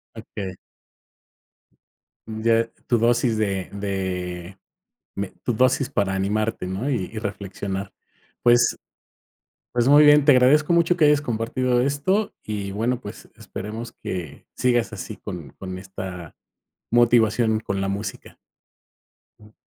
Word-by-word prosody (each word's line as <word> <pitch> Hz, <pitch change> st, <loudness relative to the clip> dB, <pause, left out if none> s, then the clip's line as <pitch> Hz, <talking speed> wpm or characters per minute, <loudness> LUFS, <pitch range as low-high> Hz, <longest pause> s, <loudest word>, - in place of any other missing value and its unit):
Okey. 95 Hz, -2 st, -7 dB, 1.7 s
Ya 115 Hz, +1 st, +1 dB, 0.2 s
tu 120 Hz, -, +3 dB
dosis 120 Hz, 0 st, +2 dB
de 95 Hz, -4 st, -1 dB
de 95 Hz, -2 st, -4 dB, 0.6 s
me 100 Hz, -1 st, -3 dB
tu 120 Hz, -, 0 dB
dosis 130 Hz, +3 st, +2 dB
para 100 Hz, -8 st, 0 dB
animarte, 105 Hz, +1 st, -1 dB
¿no?, 95 Hz, +9 st, -3 dB
y 120 Hz, -9 st, 0 dB
y -, -, -7 dB
reflexionar. 100 Hz, -1 st, -5 dB, 0.5 s
Pues 120 Hz, 0 st, +4 dB, 1.0 s
pues, 120 Hz, +1 st, +2 dB
muy 145 Hz, +2 st, +8 dB
bien, 145 Hz, -1 st, +7 dB
te 145 Hz, -, +8 dB
agradezco 145 Hz, +6 st, +4 dB
mucho 170 Hz, +1 st, +3 dB
que 160 Hz, -, +5 dB
hayas 150 Hz, -1 st, +4 dB
compartido 120 Hz, 0 st, 0 dB
esto 145 Hz, +11 st, 0 dB
y 100 Hz, -2 st, -4 dB
bueno, 115 Hz, +5 st, -1 dB
pues, 105 Hz, -4 st, -10 dB
esperemos 110 Hz, +4 st, -7 dB
que 85 Hz, -6 st, -5 dB
sigas 120 Hz, -2 st, +1 dB
así 100 Hz, -4 st, -6 dB
con -, -, -8 dB
con 95 Hz, -1 st, -7 dB
esta 95 Hz, -3 st, -8 dB, 0.6 s
motivación 115 Hz, -2 st, +3 dB
con 100 Hz, -3 st, -3 dB
la 95 Hz, -, -1 dB
música. 100 Hz, +2 st, -5 dB, 1.0 s
Jum. 105 Hz, 0 st, -18 dB
110 Hz, 125 wpm, -23 LUFS, 95-125 Hz, 1.7 s, muy